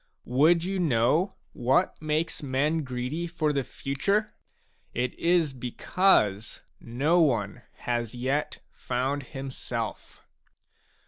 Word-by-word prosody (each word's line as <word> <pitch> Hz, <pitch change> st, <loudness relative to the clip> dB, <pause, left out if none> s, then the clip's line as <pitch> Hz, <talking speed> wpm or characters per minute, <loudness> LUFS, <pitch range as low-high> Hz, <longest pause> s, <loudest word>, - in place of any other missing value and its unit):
Would 155 Hz, +7 st, +4 dB
you 190 Hz, +1 st, -2 dB
know 155 Hz, -, +2 dB, 0.2 s
what 135 Hz, +11 st, +1 dB
makes 155 Hz, +2 st, -1 dB
men 145 Hz, +3 st, 0 dB
greedy 130 Hz, +6 st, -3 dB
for 155 Hz, -3 st, 0 dB
the 140 Hz, -1 st, 0 dB
future? 200 Hz, -, -1 dB, 0.6 s
It 125 Hz, +1 st, 0 dB
is 170 Hz, -4 st, +2 dB
because 120 Hz, -, +1 dB, 0.2 s
no 145 Hz, +9 st, +2 dB
one 120 Hz, -6 st, +1 dB, 0.2 s
has 120 Hz, -1 st, -2 dB
yet 135 Hz, +5 st, -1 dB
found 130 Hz, +3 st, -2 dB
himself. 130 Hz, -4 st, -6 dB
140 Hz, 105 wpm, -27 LUFS, 125-165 Hz, 0.6 s, Would